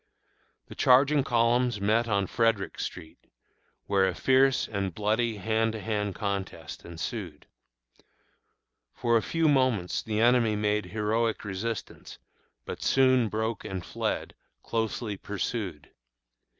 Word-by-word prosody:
The - - -11
charging 140 +3 +4
columns 120 -1 +2
met 110 +4 +2
on 100 -3 +1
Frederick 115 0 0
street, 80 - -6 0.7
where 95 -1 +3
a 90 - -2
fierce 130 +3 +3
and 100 -4 -3
bloody 110 +2 0
hand 110 +2 0
to 110 - -5
hand 105 -2 -2
contest 100 -6 -4
ensued. 85 -1 -6 1.5
For 120 -1 +1
a 115 - +4
few 165 +5 0
moments 130 -10 +2
the 110 -1 -2
enemy 115 -2 +4
made 105 0 0
heroic 110 +1 -1
resistance, 105 +3 -5 0.5
but - - -6
soon 130 -4 +3
broke 110 +1 -2
and 95 -4 -5
fled, - - -3 0.3
closely 110 -2 -2
pursued. 100 -6 -4
110 Hz, 120 wpm, -28 LUFS, 100-120 Hz, 1.5 s, charging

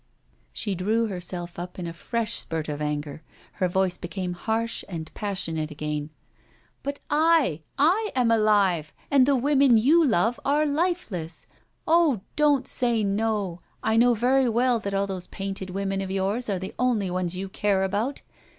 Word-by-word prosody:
She 205 - -2
drew 215 +6 +1
herself 175 -3 -4
up 180 +1 -7
in 180 - -5
a 170 - -5
fresh 230 +6 -2
spurt 160 -2 -3
of 150 -1 -4
anger. 150 0 -3 0.3
Her 185 - -1
voice 185 0 0
became 180 +1 -4
harsh 225 +5 -2
and 160 -3 -6
passionate 165 -7 -3
again. 150 0 -4 0.7
'But 280 0 -4
I 305 - +3 0.2
I 370 +10 +3
am 245 -3 +3
alive, 200 -8 +2 0.2
and 270 -2 +5
the 280 - +4
women 270 -2 +4
you 300 +10 +5
love 225 - +2
are 295 +2 +2
lifeless! 285 - -2 0.4
Oh! 320 - +3
don't 290 -3 +3
say 235 -3 +1
no! 200 -3 -1 0.2
I 220 - +2
know 240 +1 +5
very 255 +3 +3
well 240 +1 +2
that 200 -2 -3
all 195 0 +1
those 190 -2 -5
painted 195 -1 -5
women 195 +1 -2
of 190 - -4
yours 195 +5 0
are 195 - 0
the 190 +1 -6
only 230 -7 +1
ones 180 -1 -1
you 190 +1 -4
care 195 0 0
about! 210 +8 -2
200 Hz, 165 wpm, -25 LUFS, 180-250 Hz, 0.7 s, and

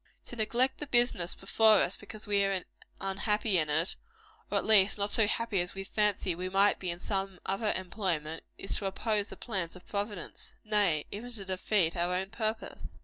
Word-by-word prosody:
To - - -8
neglect 240 +4 +1
the 295 - -5
business 240 -9 +3
before 220 +3 +4
us 195 - +2
because 210 +1 -8
we 205 -1 +2
are 195 -2 0 0.4
unhappy 200 0 +1
in 155 -1 0
it, 160 +5 +2 0.5
or - - +1
at - - 0
least 205 -2 +6
not 205 0 0
so 220 -2 +4
happy 225 -3 0
as 175 +2 -5
we 195 - -4
fancy 205 -2 +1
we 180 +2 -4
might 195 +2 +3
be 185 - -4
in 170 - -3
some 195 0 -3
other 210 +2 0
employment, 175 -4 -3
is 195 - -4
to 200 - -2
oppose 210 +1 -1
the - - -10
plans 190 -8 -2
of 180 - -13
Providence; 205 -3 -4
nay, 205 -8 +2
even 235 +5 -6
to 200 -4 -5
defeat 185 -2 +1
our 175 +1 0
own 190 +2 -2
purpose. 220 0 -4
195 Hz, 195 wpm, -30 LUFS, 185-215 Hz, 0.5 s, least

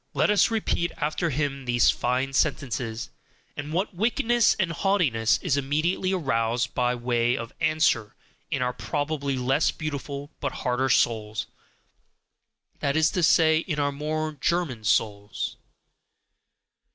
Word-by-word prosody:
Let - - +3
us 210 - +4
repeat 215 -6 0
after 155 +3 -1
him 140 -2 -2
these 120 -1 +4
fine 130 +2 -1
sentences 125 -6 -1 0.4
and 145 +1 -6
what 185 +6 -1
wickedness 235 +4 +2
and 190 -4 0
haughtiness 155 - +2
is 155 -7 +1
immediately 155 +7 0
aroused 115 -8 0
by 125 0 +1
way 120 0 +1
of 115 0 -6
answer 155 -8 +1 0.3
in 140 -5 0
our 125 0 -1
probably 140 +3 -2
less 135 +4 +2
beautiful 145 -1 -5
but 140 - -3
harder 130 +1 +1
souls, 110 -4 +1 1.3
that 140 +2 0
is 160 +1 +3
to 180 - -1
say, 160 -1 +5
in 160 -2 -3
our 145 0 +1
more 155 +2 -2
German 150 -5 -1
souls! 105 -1 -1
140 Hz, 130 wpm, -26 LUFS, 125-160 Hz, 1.3 s, say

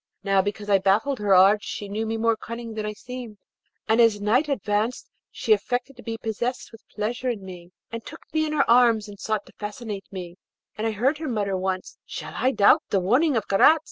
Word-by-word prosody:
Now, 195 -1 +3
because 205 +1 -4
I 200 -1 +4
baffled 215 +8 +1
her 205 -2 +3
arts 195 +3 +6
she 205 - -5
knew 215 +3 -3
me 225 +1 -2
more 230 0 +2
cunning 230 +1 -7
than 215 -1 -3
I 210 - -3
seemed, 245 -1 -9 0.5
and 220 +2 +4
as 225 -3 +4
night 245 +9 +2
advanced 215 -2 -1 0.2
she 440 - +2
affected 250 -8 -2
to 245 - -12
be 230 -2 -5
possessed 235 +3 -3
with 225 -1 -14
pleasure 230 +4 -3
in 210 -5 -4
me, 175 -2 -10 0.2
and 230 0 -6
took - - -10
me 315 0 +1
in 305 - -3
her 290 -2 +2
arms 235 -3 +4
and 200 -1 -11
sought 215 -1 -2
to - - -18
fascinate 210 -1 -6
me, 180 -2 -7 0.4
and 220 +1 -2
I - - 0
heard 265 +8 +1
her 315 -3 -4
mutter 205 -4 -1
once, 185 0 -3
'Shall - - -7
I 255 - +2
doubt 205 -6 +5
the 195 - +2
warning 250 - +2
of 215 - -2
Karaz?' 200 +11 +6
220 Hz, 220 wpm, -24 LUFS, 205-245 Hz, 0.5 s, arts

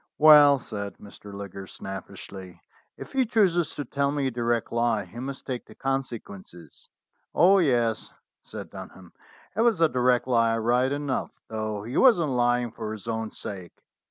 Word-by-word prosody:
"Well," 150 -2 +8
said 100 -5 -7
Mr. 105 0 -13
Liggers 100 -1 -8
snappishly, 95 -1 -9 0.4
"if - - -10
he 265 -1 +3
chooses 195 -8 +1
to 145 - -4
tell 140 0 0
me 145 -1 -1
a 130 - 0
direct 120 -1 -1
lie, 115 -3 +1
he 105 +7 -11
must 135 +2 -6
take 125 -3 -5
the - - -15
consequences." 115 -10 -6 0.5
"Oh, 195 +3 +6
yes," 120 -8 +1 0.3
said - - -9
Dunham, 95 -2 -11 0.4
"it 220 - +1
was 230 -5 +3
a 165 - +5
direct 125 -3 +2
lie 115 -2 +2
right 120 +3 +1
enough, 145 -2 -2 0.2
though 110 -2 -4
he 120 +4 -4
wasn't 175 - +5
lying 120 -1 +1
for 110 -1 -6
his 110 0 -10
own 110 -1 -2
sake. 95 -6 -9
120 Hz, 160 wpm, -26 LUFS, 105-140 Hz, 0.5 s, Well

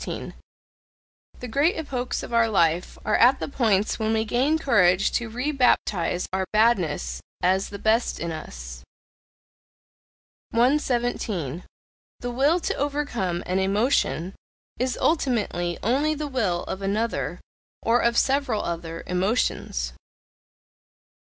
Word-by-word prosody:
The 250 - -5
great 285 +9 +2
epochs 260 -6 -3
of - - -7
our 230 -1 +4
life 170 -4 +1
are 215 - +2
at 255 +3 +5
the - - -3
points 220 -7 +1
when 220 0 0
we 220 0 +1
gain 260 +8 +2
courage 200 - +3
to 235 -2 -1
rebaptize 240 - +1
our 190 0 -1
badness 175 - +1 0.2
as 190 +2 +2
the 200 - -7
best 220 +3 +1
in 170 0 -3
us. - - -8 1.7
117. 235 - 0 0.6
The 245 - -4
will 280 +8 +3
to - - -1
overcome 270 -12 -2
an 185 +1 0
emotion, 195 - +1 0.5
is 255 0 0
ultimately 210 - 0
only 285 +7 +2
the 300 0 -4
will 210 -11 -1
of 190 - -5
another, 210 +4 -1 0.4
or 235 +1 +3
of 235 -1 +2
several 270 -5 +1
other, 165 -1 -5
emotions. 180 - -1
220 Hz, 120 wpm, -25 LUFS, 180-250 Hz, 1.7 s, at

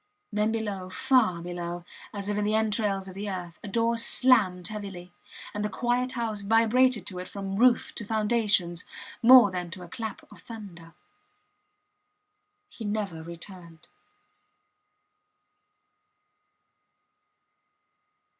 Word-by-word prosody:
Then 210 +1 +1
below, 205 -5 -4
far 185 -4 +2
below 175 0 -5
her, - - -25 0.3
as 200 0 -5
if 205 - -1
in 210 - 0
the 210 +1 +1
entrails 210 -3 0
of 190 - -9
the 200 +2 -5
earth, 180 -3 -6
a - - -6
door 230 +3 +1
slammed 215 -7 +5
heavily; 195 -4 -8 0.4
and 210 - -3
the 210 - -1
quiet 245 +4 -1
house 225 -4 -3
vibrated 225 +1 +3
to 185 -3 -6
it 180 - -6
from 195 -1 -5
roof 240 +1 +3
to - - -4
foundations, 210 -5 +1 0.4
more 240 -4 +8
than 180 -1 -4
to 180 +1 -8
a - - -10
clap 220 +5 -6
of - - -15
thunder. 180 -8 -11 1.7
He 235 - -11
never 205 -6 -3
returned. 170 0 -11
205 Hz, 125 wpm, -27 LUFS, 180-225 Hz, 1.7 s, more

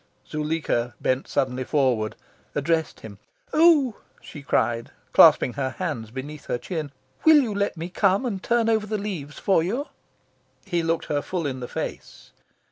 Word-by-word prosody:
Zuleika 150 -6 -1
bent 130 +1 0
suddenly 130 0 -1
forward, 125 -6 +1 0.4
addressed 160 +2 0
him. 100 -3 -10 0.3
"Oh," 305 -8 +5 0.2
she 150 - -11
cried, 115 -4 0 0.2
clasping 125 - +7
her 130 -2 -3
hands 145 - -3
beneath 140 +5 -8
her - - -1
chin, 150 +3 -5 0.3
"will 315 -1 +8
you 240 -7 0
let 200 -2 -1
me 165 +2 -4
come 195 +5 +2
and 200 -6 -3
turn 235 +1 +1
over 220 -2 +1
the 215 0 -1
leaves 180 -8 -5
for 190 -4 +2
you?" 235 - -2 0.8
He 175 -4 0
looked 165 0 -1
her 145 -1 -1
full 175 0 -3
in 130 -2 -3
the 125 - -5
face. - - -7
160 Hz, 160 wpm, -24 LUFS, 130-200 Hz, 0.8 s, will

